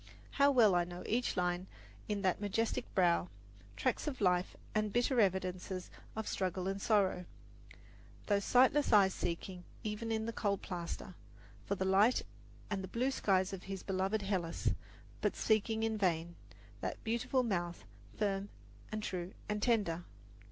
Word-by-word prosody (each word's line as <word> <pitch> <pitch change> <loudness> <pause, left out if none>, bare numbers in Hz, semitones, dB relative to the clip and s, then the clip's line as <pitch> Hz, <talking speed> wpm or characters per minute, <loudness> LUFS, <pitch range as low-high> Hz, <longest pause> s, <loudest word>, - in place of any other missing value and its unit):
How 280 0 +5
well 235 -8 +6
I 175 0 +4
know 175 +1 -7
each 245 -1 0
line 180 +1 0 0.4
in 205 -2 -2
that 185 +1 +1
majestic 215 +3 -1
brow 175 -2 +3 0.5
tracks - - 0
of 280 -3 -3
life 180 -2 +2 0.2
and 215 -1 +1
bitter 245 +3 +2
evidences 185 -1 -1 0.2
of 220 -1 -3
struggle 185 -1 -1
and 195 +1 -2
sorrow; 195 -5 +2 1.0
those 200 -1 +2
sightless 260 +6 +4
eyes 195 -3 +6
seeking, 180 +1 -4 0.2
even 215 +2 -3
in 220 0 0
the 230 - -3
cold 200 -3 -1
plaster, 180 +2 -5 0.5
for 200 - +1
the 190 - -1
light 200 +6 +4 0.5
and 195 -2 -1
the - - -4
blue 250 +7 0
skies 190 -6 +2
of 185 - -6
his 195 -1 -5
beloved 195 +2 0
Hellas, 185 -4 0 0.5
but - - +1
seeking 220 0 +1
in 220 -1 0
vain; 170 -3 0 0.4
that - - -4
beautiful 235 +3 +1
mouth, 175 -6 -2 0.3
firm 200 -1 0 0.4
and 215 0 -3
true 180 -2 -4
and 210 0 -2
tender. 200 -8 +1
195 Hz, 150 wpm, -35 LUFS, 185-220 Hz, 1.0 s, well